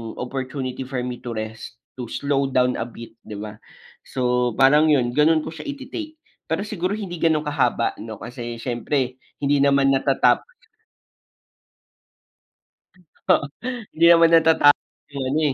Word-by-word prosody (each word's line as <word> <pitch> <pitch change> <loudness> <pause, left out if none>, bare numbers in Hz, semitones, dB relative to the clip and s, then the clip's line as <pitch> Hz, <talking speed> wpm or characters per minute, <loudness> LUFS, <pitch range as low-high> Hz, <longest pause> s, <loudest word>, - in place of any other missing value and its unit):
opportunity 130 0 -5
for 130 -2 -3
me 125 -1 -5
to 120 -2 -6
rest, 110 +1 -6 0.2
to 120 - -4
slow 140 +1 -1
down 125 -1 +1
a 115 - -3
bit 115 0 -11
di 105 - -10
ba, 105 +1 -8 0.5
so 125 -2 0
parang 150 +3 +5
'yun, 130 -5 +2
gano'n 155 +3 +3
ko - - -6
siya 165 - -9
iti-take. 305 +3 -6 0.3
Pero 165 +5 -1
siguro 200 -1 -2
hindi 185 -5 -6
gano'n 160 -2 +2
kahaba 135 -5 0
'no, 110 0 -7
kasi 120 +1 -7
siyempre 125 +2 -2 0.2
hindi 140 0 +2
naman 140 -1 +4
natatap 135 -1 +2 2.8
Oo, 140 - +4 0.5
hindi 165 - +2
naman 165 -1 +6
natatapos 160 -3 +4 0.2
'yung 135 -1 -3
ano, 155 +3 +1
135 Hz, 140 wpm, -22 LUFS, 125-155 Hz, 2.8 s, naman